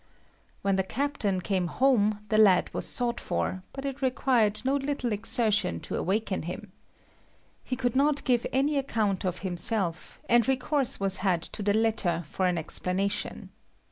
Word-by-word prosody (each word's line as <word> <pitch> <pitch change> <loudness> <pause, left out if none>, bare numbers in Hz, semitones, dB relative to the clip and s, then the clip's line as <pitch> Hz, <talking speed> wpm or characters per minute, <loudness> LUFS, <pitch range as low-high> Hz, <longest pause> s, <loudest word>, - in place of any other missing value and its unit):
When 195 -1 +2
the 190 - +2
captain 215 -4 -1
came 185 -1 -1
home 215 -2 +2
the 215 - +3
lad 195 -4 +4
was - - -2
sought 240 -1 -1
for, 185 - -2
but 270 0 -7
it 275 0 -4
required 245 -5 +2
no 275 +2 +2
little 275 -3 -2
exertion 210 - +1
to - - -5
awaken 200 0 -1
him. 185 +5 -7 0.9
He 255 - -3
could 245 -2 -1
not 285 +1 +2
give 245 -3 +1
any 280 +2 +1
account 215 -8 -1
of 180 -1 -2
himself, 180 -1 0
and 235 -2 +4
recourse 265 +1 +1
was 195 -1 +1
had 185 -3 0
to - - -7
the 205 0 +1
letter 215 -6 0
for 185 +5 -1
an 180 -1 0
explanation. 180 +4 -1
215 Hz, 160 wpm, -27 LUFS, 190-255 Hz, 0.9 s, lad